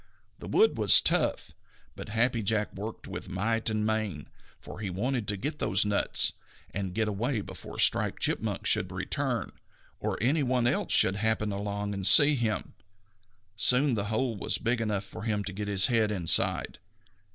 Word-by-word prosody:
The - - -9
wood 445 +1 +2
was - - +9
tough, - - -1 0.4
but - - -9
Happy 115 +2 0
Jack 105 +1 -1
worked 105 +3 -8
with - - -8
might 115 +5 -1
and 110 -1 -2
main, 110 -9 -3 0.3
for - - -11
he 105 -3 -4
wanted 115 +4 -3
to 105 - -2
get 150 +10 -5
those 95 +2 +1
nuts 105 -1 +1 0.4
and 95 0 -5
get 110 -1 0
away 110 +3 -2
before - - -11
Striped - - +2
Chipmunk - - -2
should - - 0
return, - - -3 0.5
or - - -3
any 135 - +1
one 125 -2 0
else 120 - -1
should 95 +1 +2
happen 110 0 -1
along 100 0 -4
and 95 -1 0
see 150 0 +8
him. 115 -6 -3 0.8
Soon 125 +5 +4
the 105 -3 -2
hole 115 +3 -2
was 100 - -1
big 120 0 -1
enough 105 -3 -2
for 95 - -11
him 105 -2 -2
to 95 - -6
get 105 +2 -5
his 95 -1 +3
head 110 -3 +1
inside. 85 -4 +1
105 Hz, 175 wpm, -28 LUFS, 100-115 Hz, 0.8 s, was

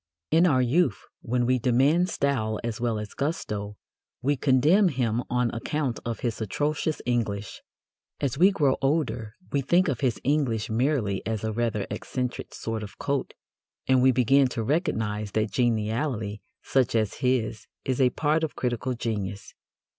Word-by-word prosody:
In 165 +3 +5
our 130 -6 +3
youth, 130 - +2 0.2
when 120 +1 0
we 130 +1 +2
demand 135 +9 +3
style 125 - 0
as 115 -1 -4
well 115 -2 0
as 105 -1 -6
gusto, 105 -9 -3 0.5
we 145 +3 +2
condemn 145 +10 +4
him 125 -6 0
on 125 -1 +1
account 135 +1 -2
of 115 -1 -4
his 115 -2 -2
atrocious 150 +8 -1
English. 110 -4 -2 0.6
As 140 -2 -1
we 180 +7 +6
grow 145 -9 +2
older, 125 -7 0 0.2
we 140 - +1
think 175 +7 +3
of 135 -6 -1
his 130 -4 0
English 130 -7 0
merely 115 -5 0
as 110 -2 -2
a 110 0 -1
rather 115 -2 -1
eccentric 125 -1 -4
sort 115 -1 -3
of 105 -1 -9
coat, 140 -1 -2 0.5
and 130 -1 +4
we 130 +1 +6
begin 130 +2 +4
to 115 -2 -3
recognize 110 - -1
that 110 -1 0
geniality 110 -2 -1 0.2
such 130 -2 +1
as 110 -3 0
his 120 -4 0 0.2
is 130 0 0
a 125 - +5
part 155 +4 +1
of 160 - -2
critical 125 +1 -2
genius. 105 -4 -4
125 Hz, 160 wpm, -26 LUFS, 110-140 Hz, 0.6 s, we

